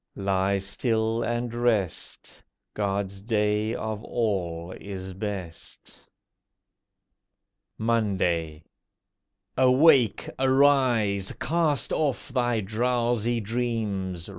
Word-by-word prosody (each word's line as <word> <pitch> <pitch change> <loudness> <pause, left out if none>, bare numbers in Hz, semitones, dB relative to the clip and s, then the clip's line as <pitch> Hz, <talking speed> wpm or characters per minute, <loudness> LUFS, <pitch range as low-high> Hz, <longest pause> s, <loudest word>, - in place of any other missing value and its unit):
Lie 95 0 +1
still 110 +3 -1
and 120 0 -2
rest— 115 -7 -2 0.3
God's 100 -1 -2
day 105 0 0
of 110 0 -4
all 90 -8 -2
is 95 -2 -6
best. 95 -4 -7 1.7
MONDAY 95 -9 0 0.9
Awake! 130 - +4
arise! 130 -7 +3
Cast 160 -3 0
off 145 -2 -1
thy 120 -3 0
drowsy 120 +2 0
dreams! 105 -6 -2
110 Hz, 75 wpm, -26 LUFS, 95-120 Hz, 1.7 s, Awake